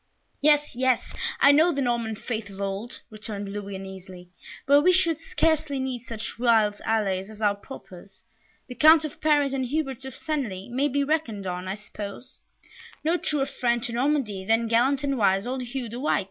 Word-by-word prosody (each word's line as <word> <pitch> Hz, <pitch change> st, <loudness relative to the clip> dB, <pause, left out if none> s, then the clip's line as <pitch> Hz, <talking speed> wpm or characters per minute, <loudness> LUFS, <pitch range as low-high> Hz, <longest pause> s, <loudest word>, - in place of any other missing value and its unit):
"Yes, 295 Hz, -2 st, +3 dB
yes, 255 Hz, 0 st, +1 dB, 0.3 s
I 280 Hz, -, +7 dB
know 315 Hz, +5 st, +5 dB
the 280 Hz, -, -3 dB
Norman 235 Hz, -4 st, 0 dB
faith 220 Hz, -1 st, -5 dB
of 195 Hz, 0 st, -11 dB
old," 200 Hz, +4 st, -4 dB
returned 210 Hz, -2 st, -5 dB
Louis, 200 Hz, -1 st, -5 dB
uneasily, 190 Hz, -2 st, -10 dB, 0.3 s
"but 285 Hz, +1 st, +6 dB
we 365 Hz, -, +5 dB
should 335 Hz, -4 st, +2 dB
scarcely 315 Hz, -3 st, 0 dB
need 260 Hz, -2 st, -3 dB
such 225 Hz, -1 st, -5 dB
wild 220 Hz, -4 st, +3 dB
allies 200 Hz, -3 st, 0 dB
as 215 Hz, -1 st, -12 dB
you 205 Hz, -2 st, +3 dB
propose; 200 Hz, -4 st, -12 dB, 0.4 s
the 250 Hz, -, -7 dB
Count 310 Hz, +3 st, +6 dB
of 300 Hz, -, -8 dB
Paris, 290 Hz, -3 st, +3 dB
and 260 Hz, -2 st, -1 dB
Hubert 270 Hz, -2 st, -2 dB
of 265 Hz, -2 st, -7 dB
Senlis 240 Hz, -11 st, -3 dB
may 270 Hz, +4 st, +1 dB
be 285 Hz, 0 st, 0 dB
reckoned 275 Hz, -10 st, -1 dB
on, 180 Hz, 0 st, -4 dB
I 190 Hz, -, -2 dB
suppose." 210 Hz, +2 st, -9 dB, 0.6 s
"No 325 Hz, +3 st, +2 dB
truer 295 Hz, -5 st, 0 dB
friend 240 Hz, -3 st, -1 dB
to 235 Hz, -, -3 dB
Normandy 245 Hz, -6 st, 0 dB
than 225 Hz, +3 st, +2 dB
gallant 260 Hz, +5 st, +2 dB
and 275 Hz, -2 st, 0 dB
wise 195 Hz, 0 st, +3 dB
old 255 Hz, +1 st, -3 dB
Hugh 250 Hz, 0 st, -4 dB
the 235 Hz, +2 st, -7 dB
White!" 290 Hz, -, +1 dB
240 Hz, 185 wpm, -26 LUFS, 205-280 Hz, 0.6 s, I